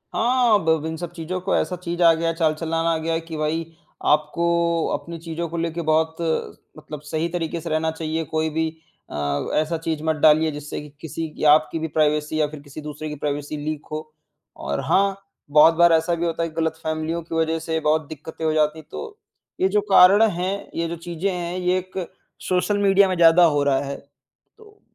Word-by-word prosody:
हाँ, 240 -3 +3
ब - - +2
अब 160 -1 +2
इन 160 0 -3
सब 170 0 -6
चीज़ों 175 +2 -4
को 195 - 0
ऐसा 180 - 0
चीज़ 175 0 -3
आ 165 -1 +7
गया, 165 +1 0
चाल-चलन 160 0 -1
आ 165 0 +1
गया 165 +1 -2
है 165 - 0
कि 165 -1 -8
भई 155 +2 -1 0.5
आपको 150 +3 0 0.5
अपनी 170 0 -5
चीज़ों 165 +1 -4
को 170 - -5
लेके 165 0 -2
बहुत 160 +1 +2 0.6
मतलब 150 -1 -9
सही 155 +2 -2
तरीके 170 -1 -3
से - - -6
रहना 160 +1 0
चाहिए। 160 0 -3
कोई 160 0 0
भी 160 +1 -1 0.4
अ, 70 -1 -2
ऐसा 155 +2 +1
चीज़ 160 -1 -3
मत 160 -1 +1
डालिए 155 +1 +4
जिससे 150 0 -6
कि 150 - -11
किसी 160 +1 -4
की - - -6
आपकी 155 +1 +1
भी 160 - -2
प्राइवेसी 150 0 0
या 150 - +2
फिर 150 0 -9
किसी 145 +1 -10
दूसरे 150 +1 -6
की 150 - -5
प्राइवेसी 145 +1 -2
लीक 150 0 -4
हो 155 0 -3 0.5
और 70 0 -3
हाँ, 195 0 +2 0.3
बहुत 155 +3 +7
बार 170 0 +5
ऐसा 165 +2 +2
भी 170 - -2
होता 165 0 -1
है 165 - -2
गलत 160 0 -1
फैमलियों 160 +1 -2
की 165 - -6
वजह 160 0 +1
से 160 0 -2
बहुत 155 -1 +1
दिक्कतें 160 +1 -7
हो 155 - +2
जाती 155 0 +1
हैं, 155 - -15
तो 450 -2 -7 0.4
ये 375 - +5
जो 420 - +2
कारण 195 +4 +7
हैं, 185 +3 -3
ये 165 0 -1
जो 170 - -4
चीज़ें 170 +3 -3
हैं, 175 0 -4
ये 180 0 +1
एक 185 +1 -7 0.5
सोशल 185 +3 +1
मीडिया 195 0 +5
में 185 - 0
ज़्यादा 170 +1 +6
हो 145 -3 +2
रहा 135 -1 +2
है। 140 0 -4 0.6
तो 425 -1 -19
160 Hz, 210 wpm, -22 LUFS, 155-170 Hz, 0.6 s, आ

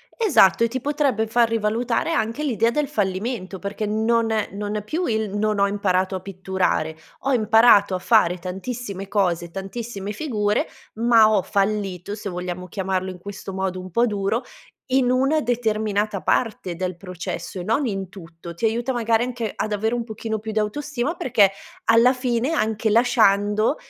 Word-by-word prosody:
Esatto, 315 - +4
e - - +4
ti 255 +3 -3
potrebbe 280 -6 0
far 230 +1 +3
rivalutare 230 +5 0
anche 230 -1 -1
l'idea 230 -5 +1
del 295 +2 0
fallimento, 195 -3 -2
perché 200 +2 -4
non 225 +2 +1
è 215 -2 0
non 205 +1 -4
è 210 - -4
più 320 +11 -2
il: 220 - -1
“Non 210 0 0
ho 200 - +4
imparato 190 -2 0
a 185 - -4
pitturare. 185 -4 -1 0.3
Ho 275 - 0
imparato 220 -3 +5
a 185 - -1
fare 185 -4 +3
tantissime 195 +2 -5
cose, 175 -4 0
tantissime 200 +2 -5
figure, 210 -6 0 0.3
ma 225 -1 +5
ho 210 - +3
fallito", 200 -1 -1
se 210 -1 -6
vogliamo 180 0 -5
chiamarlo 190 0 -2
in 185 - -10
questo 200 +1 -8
modo 190 -1 -2
un 185 0 -10
po' 235 +7 +3
duro, 205 +2 -1 0.5
"in 255 -1 +3
una 270 +5 +2
determinata 215 -4 -1
parte 210 -6 0
del 185 0 -3
processo 180 0 -6
e - - -4
non 225 +9 +1
in 195 -5 -3
tutto." 170 -2 -11
Ti 170 - -13
aiuta 235 +4 0
magari 230 -1 +1
anche 240 -3 -3
ad 215 - -2
avere 220 +3 0
un 240 -1 -1
pochino 220 0 -4
più 220 +1 -6
d'autostima, 260 +7 -2
perché 225 - +3 0.3
alla 230 +3 +5
fine 250 +2 -1
anche 220 -4 0
lasciando, 215 0 +3
215 Hz, 170 wpm, -22 LUFS, 195-235 Hz, 0.5 s, imparato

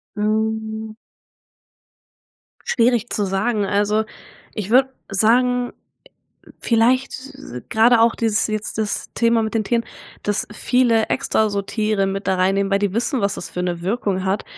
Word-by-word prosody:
Hm. 220 +1 -2 1.7
Schwierig 240 -1 +2
zu 205 - 0
sagen. 205 +3 0
Also, 205 +2 +1 0.5
ich 210 0 -5
würde 260 +1 +5 0.2
sagen 245 +4 +2 0.9
vielleicht, 245 +3 +2 0.2
äh 270 - -9
grade 230 +1 +5
auch 230 0 +4
dieses 225 -2 +1
jetzt 215 0 -4
das 215 -1 -2
Thema 230 -1 +2
mit 220 +1 -3
den 220 - +2
Tieren, 230 +2 0 0.4
dass 205 -1 -1
viele 235 -1 +2
extra 220 -5 +1
so 200 0 -1
Tiere 210 -1 0
mit 195 +1 -3
da 190 - +3
reinnehmen, 195 +2 +1
weil 195 - +3
die 200 -2 0
wissen, 245 +3 -1
was 200 -1 0
das - - -6
für 180 - -4
'ne 175 -1 -3
Wirkung 195 -2 -1
hat 190 +2 -1
220 Hz, 150 wpm, -21 LUFS, 200-235 Hz, 1.7 s, würde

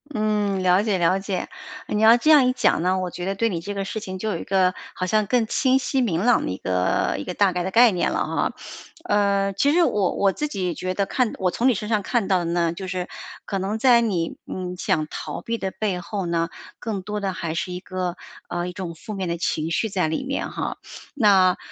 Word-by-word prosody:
嗯， 210 -3 0
了 185 +2 +4
解 210 -3 +1
了 180 +2 +2
解， 195 -2 -3 0.4
你 210 - -1
要 225 +1 +8
这 305 +6 +3
样 290 -4 +7
一 255 - +2
讲 250 -9 +2
呢， 185 +1 +1
我 180 -1 -3
觉 175 - -5
得 195 +1 -1
对 230 +3 +1
你 175 -5 -2
这 200 +5 -5
个 200 -1 -2
事 205 +3 -4
情 190 -3 -6
就 220 +4 -3
有 185 - -1
一 - - -7
个 185 -1 +2 0.2
好 185 - -2
像 215 +3 +2
更 235 +2 +2
清 260 +3 +2
晰 265 +1 -1
明 190 -9 +1
朗 245 0 +3
的 - - -2
一 90 - -4
个 90 0 0
一 100 - -5
个 - - -4
大 200 +1 +3
概 180 0 -2
的 190 - -3
概 235 +2 +6
念 180 -3 0
了 - - 0
哈。 - - -1 0.5
呃， 200 -1 +2
其 280 +9 +2
实 350 +1 +5
我 205 - +1
我 195 -1 +2
自 300 - -3
己 185 - -2
觉 185 +3 -3
得 200 +1 0
看 245 +2 0
我 185 -1 +1
从 240 - +1
你 260 - +5
身 210 0 -4
上 215 -3 +1
看 230 -1 0
到 190 - +4
的 175 - -3
呢， 170 0 +1
就 185 +3 -6
是 185 -1 -3 0.4
可 195 - -2
能 195 +3 -2
在 245 -1 +6
你， 190 -8 -1
嗯， 180 -1 -5
想 155 -3 0
逃 - - -6
避 230 0 -3
的 190 -3 -3
背 190 -1 -2
后 195 +1 -4
呢， 170 -1 0 0.3
更 215 -4 -3
多 210 +3 -4
的 195 -2 -2
还 170 -3 -4
是 180 +2 -3
一 180 - -5
个， 185 -2 -3 0.3
呃， 175 0 -3
一 - - -5
种 180 -2 -6
负 215 +6 -8
面 190 -2 -3
的 170 0 -2
情 160 -1 -1
绪 220 +7 0
在 185 -5 0
里 155 - -2
面 275 +1 -3
哈。 - - -4 0.4
那， 195 -7 +5
195 Hz, 270 characters per minute, -23 LUFS, 180-215 Hz, 0.5 s, 要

